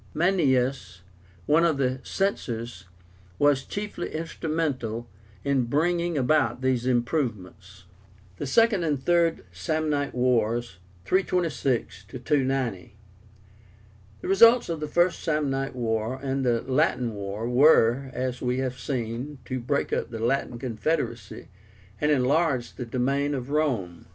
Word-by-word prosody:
Maenius, 135 - +1 0.4
one 160 - +4
of 165 -4 +2
the 130 -1 0
Censors, 120 - -3 0.5
was 145 -2 +3
chiefly 205 -1 -5
instrumental 155 -8 -3 0.4
in 135 -3 +1
bringing 170 +5 0
about 130 -2 +2
these 130 -2 0
improvements. 105 - -2 0.5
THE 145 - -4
SECOND 225 - +3
AND 145 -5 -1
THIRD 170 - +2
SAMNITE 145 - -1
WARS 120 -4 +1 0.3
(326 145 - 0
290). 130 -6 -1 1.3
The - - -6
results 230 +4 +6
of 165 -2 -2
the 150 - -3
First 175 +3 +1
Samnite 140 -4 -1
War 115 +1 -2
and 135 0 -2
the 120 -2 +1
Latin 125 -2 +1
War 100 +2 -4
were, 130 0 +4
as 125 0 -3
we 125 0 0
have 130 -1 -3
seen, 125 +2 -4
to 130 0 -3
break 135 +4 -1
up - - -1
the 115 - -6
Latin 120 +1 -1
confederacy, 120 - -3 0.5
and 150 - +1
enlarge 140 -1 +1
the 125 - -6
domain 140 +4 0
of 130 +1 -5
Rome. 115 - -1
130 Hz, 120 wpm, -26 LUFS, 120-155 Hz, 1.3 s, results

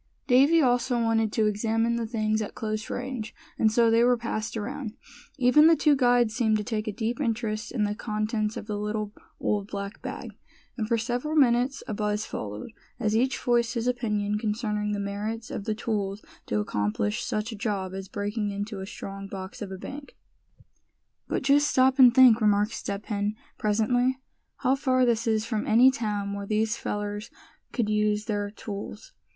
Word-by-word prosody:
Davy 285 +5 +5
also 245 0 +2
wanted 225 -2 +1
to 220 - +2
examine 225 +2 +1
the 235 -1 -2
things 215 -1 0
at 210 - -5
close 215 -1 -3
range, 245 -4 -4 0.2
and 220 - +4
so 230 0 +4
they 230 +1 +5
were 245 0 +4
passed 225 -1 -3
around. 235 +1 -4 0.4
Even 285 +4 +6
the 330 - +7
two 300 -2 +4
guides 245 -4 +3
seemed 220 -3 +2
to 210 - -3
take 220 -1 -3
a - - 0
deep 230 +6 -3
interest 225 -3 -2
in 230 -4 0
the 205 0 0
contents 215 0 -2
of - - -6
the 210 -1 -3
little 210 0 -3 0.3
old 205 -1 -1
black 200 +1 -6
bag; - - -6 0.4
and 220 -4 -2
for 230 0 +2
several 245 +7 -2
minutes 260 -1 +3
a 220 - -3
buzz 210 0 -1
followed, 105 - -6 0.3
as 215 0 +1
each 250 +3 +2
voiced 240 0 +1
his 230 0 -1
opinion 210 -4 0
concerning 210 -1 -1
the 205 - -2
merits 210 +3 -4
of 200 - -5
the 215 - -1
tools 210 -3 -2 0.2
to 105 - 0
accomplish 105 0 -1
such 215 +2 -2
a - - -5
job 200 -4 -2
as 190 0 -6
breaking 205 +2 -2
into 205 +1 -4
a 190 - -6
strong 195 0 -7
box 190 -1 -8
of 200 -2 -5
a 190 - -5
bank. 280 +8 -9 1.1
"But - - -2
just 285 +2 +4
stop 260 0 +3
and 250 -2 +9
think," 245 -2 +7
remarked 210 0 +3
Step 200 +1 -4
Hen, 205 -1 -1 0.2
presently, 245 +5 +2 0.4
"how 260 -1 +2
far 260 -2 +2
this 230 -1 +1
is 220 -1 +1
from 220 -2 -2
any 245 +4 +6
town 210 -5 -2
where 200 0 -5
these 215 +1 +1
fellers 205 0 -4 0.4
could 235 -4 0
use 210 0 +1
their 205 -2 -2
tools. 210 - -8
220 Hz, 185 wpm, -27 LUFS, 210-245 Hz, 1.1 s, and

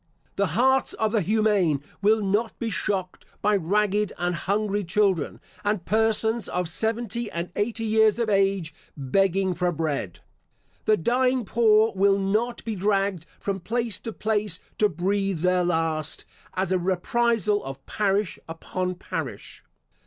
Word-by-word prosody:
The 200 - +1
hearts 265 +2 +3
of 220 -1 0
the 220 -2 +2
humane 205 -6 +2 0.2
will 215 +1 +3
not 210 +4 0
be 230 -2 -3
shocked 190 -3 -2 0.2
by 210 0 +2
ragged 205 +3 +1
and 175 0 -1
hungry 205 +4 -1
children, 190 -3 0 0.2
and 205 -3 -1
persons 220 0 +2
of 180 -1 -1
seventy 225 +5 -1
and 170 +1 -4
eighty 225 +2 -1
years 220 0 +4
of 235 -2 0
age, 195 -5 +1 0.2
begging 190 +7 +1
for 180 0 0
bread. 145 - -3 0.7
The 215 - +4
dying 250 +5 +1
poor 220 0 +4
will 195 +1 +4
not 215 +6 -1
be 225 -2 -2
dragged 195 -2 0
from 195 -1 -2
place 230 +3 -1
to 225 - -6
place 210 -4 -1 0.2
to 210 - +4
breathe 195 +1 -1
their 180 0 +2
last, 160 -3 -1 0.3
as 185 0 -1
a 185 - +2
reprisal 205 +3 +1
of 135 0 -8
parish 205 -2 0
upon 180 +2 -3
parish. 180 - -6
200 Hz, 145 wpm, -25 LUFS, 180-220 Hz, 0.7 s, years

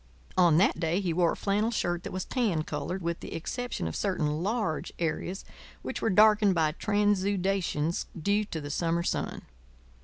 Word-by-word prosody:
On 175 -4 +5
that 180 -2 +3
day 165 +2 +1
he 180 -4 -1
wore 170 0 +3
a - - -5
flannel 210 +3 0
shirt 175 -6 -1
that - - -7
was 185 0 -3
tan 210 - 0
coloured, 160 +5 -4
with 170 0 -2
the - - -7
exception 245 - -3
of 80 - -5
certain 155 -6 -1
large 205 -5 -1
areas 175 +3 -3 0.4
which - - -4
were - - +1
darkened 210 -1 +5
by 160 -2 +2
transudations 195 -4 0
due 200 +6 +2
to 165 - -5
the 145 -1 -6
summer 170 +2 0
sun. - - -2
180 Hz, 175 wpm, -29 LUFS, 165-205 Hz, 0.4 s, On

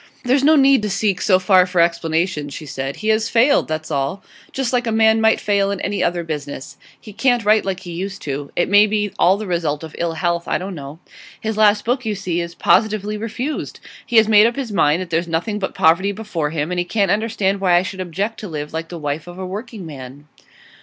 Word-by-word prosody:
'There's 260 +2 +2
no 310 +2 +6
need 275 -3 +5
to 210 - -2
seek 195 0 0
so 185 -3 +4
far 185 0 +4
for 180 -1 -1
explanations,' 165 -3 0
she 155 - -8
said. 135 -1 -5
'He 215 - -3
has 220 +1 +2
failed, 255 +5 +3
that's 155 0 -4
all; 140 +7 -2 0.3
just 265 -2 -2
like 245 -1 +1
a - - 0
man 220 0 +3
might 220 0 +3
fail 200 -1 +1
in 200 -1 -3
any 205 - -1
other 175 0 0
business. 145 -3 -6 0.2
He 215 - -12
can't 245 0 +1
write 215 +1 +4
like 190 -1 -3
he 175 - -8
used 190 +3 -5
to. 140 0 -5
It 175 - +1
may 205 +1 +5
be 210 -1 -1
all 185 +3 +4
the 215 - -5
result 165 -5 -2
of 160 - -9
ill 170 -1 -1
health; 170 +1 -1
I - - +1
don't 190 +1 -6
know. 145 -1 -8 0.4
His 220 0 -3
last 210 -1 +3
book, 250 +2 0
you 215 -2 -2
see, 180 -3 -2
is 170 0 -7
positively 210 0 +1
refused. 230 +7 -4 0.2
He 240 - -5
has 220 -1 +6
made 215 0 +6
up 235 - -2
his 265 -5 -4
mind 170 -3 +2
that 175 - -13
there's 170 +1 0
nothing 175 +6 -2
but 190 - -4
poverty 170 +5 +3
before 195 -7 -3
him, 155 +1 -3
and 180 - -1
he - - +1
can't 200 0 0
understand 200 -2 0
why 180 -2 +3
I 175 - +4
should 190 0 -6
object 195 +6 -3
to 210 - -6
live 150 -3 -6
like 160 0 -4
the 175 - -7
wife 150 +1 -4
of 175 0 -10
a 190 - -5
working 210 +1 -7
man. 140 -1 -10
190 Hz, 240 wpm, -19 LUFS, 165-215 Hz, 0.4 s, no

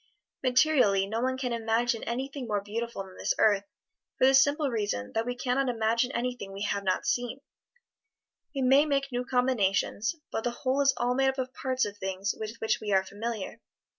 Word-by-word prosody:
Materially, 255 -7 +4
no 220 +3 -2
one 260 +1 0
can 250 -2 -2
imagine 230 +1 0
anything 265 +2 -4
more 210 -2 0
beautiful 230 0 -4
than 190 -1 -14
this - - 0
earth, 205 -2 +3 0.5
for - - +4
the 265 - +6
simple 285 +1 +4
reason 205 - -2
that 225 +1 -1
we 245 - -2
can 250 +1 -1
not 275 -1 +1
imagine 230 +2 +1
anything 245 -5 -3
we 195 +1 -5
have 200 -1 -1
not 185 -1 0
seen; 245 +2 -1 1.2
we 270 - 0
may 270 +3 +6
make 275 -2 0
new 245 0 -1
combinations, 240 - +1 0.2
but 225 - -2
the 245 - +1
whole 260 +3 -1
is 275 -1 +4
all 245 +1 +1
made 265 +1 +3
up 265 - -3
of 255 0 -3
parts 260 -1 0
of 205 0 -7
things 190 +1 -2
with 220 +1 -5
which 220 -1 0
we 210 -1 -3
are 190 -1 +4
familiar. 215 +1 -5
240 Hz, 195 wpm, -28 LUFS, 210-260 Hz, 1.2 s, the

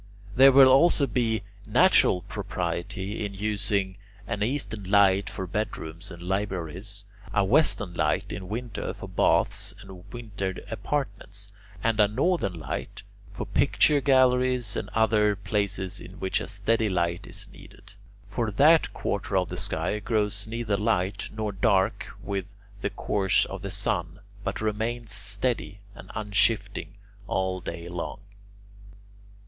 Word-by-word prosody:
There 135 +2 +8
will 135 0 +9
also 140 +3 +5
be 115 -3 0 0.2
natural 90 - +4
propriety 95 +4 -4
in 100 -1 -4
using 100 -2 -1 0.3
an 105 -1 -3
eastern 110 -3 -1
light 100 -1 +4
for 95 - -5
bedrooms 90 -3 -4
and 85 -1 -10
libraries, 95 +1 -3 0.3
a 100 - +2
western 100 - +2
light 75 -1 0
in 90 +1 -6
winter 115 0 -4
for - - -8
baths - - +2
and 90 -2 -13
winter 100 -5 -4 0.2
apartments, 100 -3 -4 0.3
and 110 -1 +1
a 105 - +6
northern 105 - 0
light 75 - -5 0.3
for - - -6
picture 145 -2 +3
galleries 130 -4 +3
and - - -3
other 105 -2 +3
places 100 -2 -2
in - - -10
which 95 - 0
a - - -5
steady 110 +2 +1
light 85 -2 -1
is - - -8
needed; - - -15 0.3
for 115 -2 -2
that 150 +10 +5
quarter 100 -1 -1
of 90 -2 +1
the 90 - -5
sky 90 +2 -1
grows 105 -2 +1
neither 115 -2 -1
light 100 -2 0
nor 110 -1 -3
dark 95 +1 +1 0.2
with 100 -2 -3 0.3
the 105 - 0
course 95 -2 +1
of - - -7
the - - -5
sun, 85 +2 -1 0.2
but - - -3
remains 110 +1 -2
steady 100 +1 -1
and - - -12
unshifting 105 -1 0 0.3
all 95 -1 -1
day 85 0 -6
long. 90 +3 -5
100 Hz, 135 wpm, -26 LUFS, 95-110 Hz, 0.3 s, will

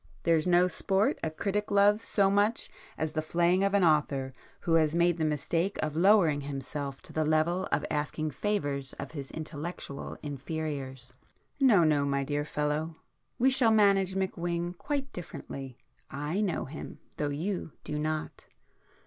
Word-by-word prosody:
There's 165 0 +3
no 180 0 +5
sport 195 +4 +1
a 160 - -1
critic 205 +6 -2
loves 205 +1 +4
so 195 -3 +2
much 205 +3 +1 0.3
as 155 -1 -1
the 155 - -1
flaying 175 +4 +2
of 200 0 +2
an 200 - +4
author 145 -5 +2 0.3
who 165 - 0
has 160 -1 +3
made 170 0 +3
the - - +1
mistake 165 +5 0
of 155 -1 -2
lowering 170 -5 +4
himself 140 0 -5
to - - -12
the 155 - +1
level 155 +5 +1
of - - +1
asking 150 +1 -2
favours 145 -5 -1
of 140 - -7
his 140 -4 -7
intellectual 155 -2 -6
inferiors! 140 -3 -5 0.5
No, 230 -10 +6
no, 150 -3 +3
my 140 -1 0
dear 145 +1 -2
fellow!—we 155 - -2
shall 255 -3 +4
manage 200 -3 +4
McWhing 175 -2 -2
quite 280 +6 -3
differently,—I 145 - -6
know 195 -5 -1
him, 150 +3 -8 0.2
though 150 - -1
you 165 +3 -3
do 150 - -3
not." 155 0 -3
160 Hz, 150 wpm, -29 LUFS, 145-190 Hz, 0.5 s, No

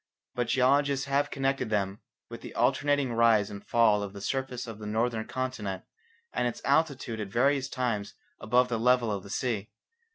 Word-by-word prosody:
But 120 -1 -1
geologists 135 +2 +2
have 140 +1 +1
connected 135 -4 -1
them 100 -2 -1 0.3
with - - -9
the - - -9
alternating 145 -3 +2
rise 115 -3 +4
and 100 0 -8
fall 110 -3 +3
of 100 -1 -5
the 100 - -8
surface 130 +2 -3
of 115 -3 -8
the 105 - -7
northern 110 +1 -1
continent 110 -8 -4 0.5
and 125 - +1
its 120 - -4
altitude 140 -5 +1
at 105 - -3
various 135 +6 +1
times 115 -7 -2 0.2
above 125 +3 +3
the 115 -2 -2
level 125 -1 +3
of 100 -2 -2
the 100 - -12
sea. 105 0 -2
120 Hz, 175 wpm, -28 LUFS, 105-135 Hz, 0.5 s, rise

